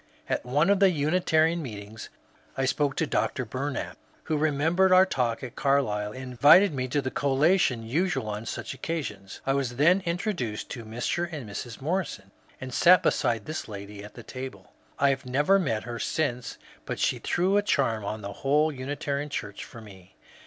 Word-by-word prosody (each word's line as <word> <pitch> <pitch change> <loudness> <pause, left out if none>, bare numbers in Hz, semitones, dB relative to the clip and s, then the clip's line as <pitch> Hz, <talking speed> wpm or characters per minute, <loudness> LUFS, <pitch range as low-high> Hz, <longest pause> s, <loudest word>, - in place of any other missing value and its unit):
At - - -1
one 145 +9 +2
of 200 - +3
the 195 -1 +6
Unitarian 160 +1 +2
meetings 110 -4 -8 0.5
I 135 - +1
spoke 140 +1 0
to 160 - +1
Dr. 130 -3 -1
Bumap, 130 +4 -4 0.3
who 155 - -1
remembered 155 +5 +2
our 185 +1 +7
talk 125 -9 -1
at 125 - -7
Carlisle, 105 -7 +1
and 130 - -7
invited 145 - +6
me 130 -2 -2
to 140 +2 -1
the 130 - -3
collation 140 -2 +2
usual 150 +1 -1
on 105 +2 -5
such - - -5
occasions. 105 - -5
I 135 - +2
was 135 -3 -1
then 170 +8 +4
introduced 170 - -3
to 115 -3 -6
Mr. 125 +10 -2
and 145 -8 -6
Mrs. 115 +4 -7
Morrison, 155 - -3 0.3
and 130 -1 -7
sat 180 +5 +6
beside 115 -3 +1
this 155 +1 -5
lady 100 -1 -8
at 105 - -12
the 120 - -10
table. 130 +3 -8 0.3
I 140 - +4
have 130 -1 -4
never 145 +10 +3
met 115 - -1
her 120 0 -6
since, 125 -6 -2 0.3
but - - -3
she - - 0
threw 185 +3 +1
a - - +4
charm 135 - 0
on 105 +2 -4
the 100 0 -5
whole 150 +3 +2
Unitarian 140 +1 -3
Church 105 -7 -5
for 120 - -11
me. 95 -4 -15
135 Hz, 180 wpm, -27 LUFS, 115-160 Hz, 0.5 s, our